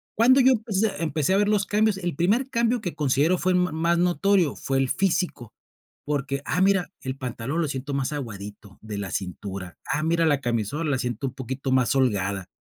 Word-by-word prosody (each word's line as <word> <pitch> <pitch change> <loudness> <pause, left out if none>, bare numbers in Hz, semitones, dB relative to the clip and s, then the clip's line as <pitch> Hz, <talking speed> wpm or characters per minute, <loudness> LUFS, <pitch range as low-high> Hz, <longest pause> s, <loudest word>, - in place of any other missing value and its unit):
¿Cuándo 255 +4 +5
yo 260 0 +6
empecé 220 -3 0
empecé 155 +2 0
a 195 - +4
ver 205 0 +2
los 205 -1 +2
cambios? 210 0 +2
El 175 -4 -3
primer 220 - +1
cambio 235 0 +1
que 175 - -4
considero 150 +5 +2
fue 185 +1 +1
ma 180 -2 +1
más 170 +2 +1
notorio, 180 -2 +2
fue 135 - -2
el 135 -1 +2
físico, 180 - -1 0.5
porque: 140 -1 -2
"Ah, 180 - 0
mira, 195 -2 +2
el 130 0 -5
pantalón 125 +4 -4
lo 155 - 0
siento 140 +1 -4
más 140 +2 -1
aguadito 105 -6 -7
de 105 -2 -6
la 95 -2 -5
cintura, 95 -1 -5 0.2
ah, 150 - 0
mira, 165 +1 +2
la 145 -3 +3
camisola, 120 +6 -1
la 130 - +1
siento 125 +2 -2
un 130 - -6
poquito 130 +1 -4
más 130 0 +3
holgada". 100 -7 0
145 Hz, 200 wpm, -25 LUFS, 125-190 Hz, 0.5 s, yo